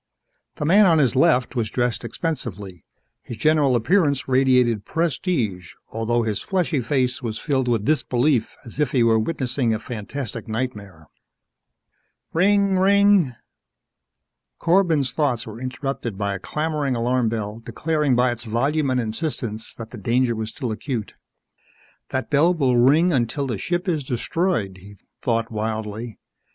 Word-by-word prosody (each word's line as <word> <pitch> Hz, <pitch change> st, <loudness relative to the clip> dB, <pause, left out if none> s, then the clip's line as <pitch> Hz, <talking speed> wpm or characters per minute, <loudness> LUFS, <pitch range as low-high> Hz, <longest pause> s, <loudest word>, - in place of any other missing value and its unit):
The 150 Hz, -, -3 dB
man 195 Hz, +6 st, +6 dB
on 165 Hz, -2 st, +4 dB
his 140 Hz, -3 st, +2 dB
left 130 Hz, -2 st, +3 dB
was 115 Hz, -3 st, -1 dB
dressed 120 Hz, 0 st, -1 dB
expensively. 105 Hz, -, -5 dB, 0.4 s
His 120 Hz, -, -8 dB
general 145 Hz, 0 st, +3 dB
appearance 140 Hz, -, +2 dB
radiated 125 Hz, -4 st, +3 dB
prestige 130 Hz, -, -2 dB
although 115 Hz, +1 st, 0 dB
his 110 Hz, -3 st, -2 dB
fleshy 175 Hz, -7 st, 0 dB
face 130 Hz, +2 st, 0 dB
was 115 Hz, -3 st, -4 dB
filled 135 Hz, -4 st, -1 dB
with 115 Hz, -4 st, 0 dB
disbelief 135 Hz, -3 st, +1 dB
as 120 Hz, +4 st, -10 dB
if 150 Hz, -4 st, 0 dB
he 125 Hz, -3 st, +4 dB
were 115 Hz, -1 st, +4 dB
witnessing 125 Hz, -3 st, -1 dB
a -, -, -1 dB
fantastic 120 Hz, +2 st, -6 dB
nightmare. 105 Hz, -8 st, -5 dB, 1.3 s
Rinnnng! 195 Hz, +2 st, +3 dB
Rinnnng! 200 Hz, -7 st, +4 dB, 1.2 s
Corbin's 165 Hz, -6 st, +2 dB
thoughts 130 Hz, -7 st, 0 dB
were 110 Hz, +2 st, -9 dB
interrupted 130 Hz, -4 st, -4 dB
by 100 Hz, -1 st, -1 dB
a 95 Hz, -, -5 dB
clamoring 150 Hz, +2 st, -2 dB
alarm 120 Hz, 0 st, +1 dB
bell 110 Hz, -1 st, -4 dB
declaring 150 Hz, +2 st, 0 dB
by 125 Hz, 0 st, +3 dB
its 120 Hz, 0 st, -5 dB
volume 140 Hz, +6 st, 0 dB
and 130 Hz, -1 st, +1 dB
insistence 115 Hz, -2 st, -4 dB
that 115 Hz, -1 st, -9 dB
the 120 Hz, -, -8 dB
danger 120 Hz, +3 st, +1 dB
was 110 Hz, 0 st, -4 dB
still 120 Hz, +1 st, -4 dB
acute. 115 Hz, -1 st, -4 dB, 1.0 s
That 130 Hz, +3 st, -3 dB
bell 165 Hz, +5 st, +4 dB
will 135 Hz, -6 st, +2 dB
ring 150 Hz, +9 st, +4 dB
until 130 Hz, +2 st, 0 dB
the 120 Hz, -7 st, -3 dB
ship 175 Hz, -, -2 dB
is 160 Hz, -5 st, 0 dB
destroyed, 125 Hz, -, -1 dB
he 100 Hz, +2 st, -14 dB, 0.2 s
thought 115 Hz, -2 st, -1 dB
wildly. 110 Hz, +1 st, -4 dB
125 Hz, 145 wpm, -22 LUFS, 115-150 Hz, 1.3 s, man